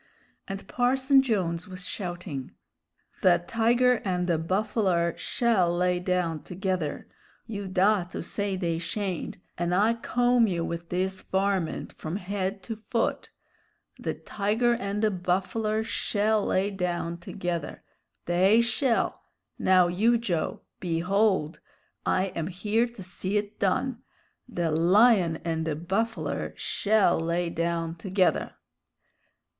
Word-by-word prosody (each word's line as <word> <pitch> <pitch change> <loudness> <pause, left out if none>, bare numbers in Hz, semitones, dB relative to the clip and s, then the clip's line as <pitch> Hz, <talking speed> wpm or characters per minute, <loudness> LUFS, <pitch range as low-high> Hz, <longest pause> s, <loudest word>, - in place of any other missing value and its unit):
And 195 -1 -6
Parson 265 +2 +3
Jones 190 -8 -1
was 185 -1 -7
shouting: 175 -8 -5 0.7
"The 175 -2 +4
tiger 240 +2 +3
and 180 -2 0
the 170 -3 +1
buffler 185 -1 +1
shell 185 -8 +1
lay 180 0 +2
down 180 -3 -1
together! 185 -5 -3 0.4
You 205 -3 -5
dah 190 +1 +3
to 180 - -6
say 200 -2 -2
they 170 -3 -1
shayn't 190 0 -3 0.2
and 175 +1 +1
I'll 215 +4 +3
comb 245 0 +2
you 170 -4 -1
with 170 0 -5
this 190 +1 -1
varmint 190 -3 -1
from 155 +3 -5
head 195 0 -3
to 225 - -5
foot! 225 +2 -2 0.7
The - - -3
tiger 220 +4 0
and 205 -1 -2
the 215 - +3
buffler 195 +4 0
shell 215 -1 +1
lay 195 +2 +1
down 175 -3 -2
together. 170 -3 -4 0.4
They 185 +6 +4
shell! 235 +1 +1 0.4
Now, 185 -1 +5
you, 220 +7 +3
Joe! 180 -9 -2 0.2
Behold! 180 -1 +1 0.5
I 185 0 +1
am 165 -1 -2
here 210 +6 0
to 235 -5 -10
see 185 +2 -2
it 205 0 -4
done. 230 +5 0 0.5
The 175 -8 -1
lion 180 +2 +5
and 160 -1 -1
the 160 -2 -1
buffler 195 +8 -2
shell 210 -5 +2
lay 170 +1 -1
down 165 0 -1
together!" 185 +1 +1
190 Hz, 125 wpm, -27 LUFS, 175-215 Hz, 0.7 s, Now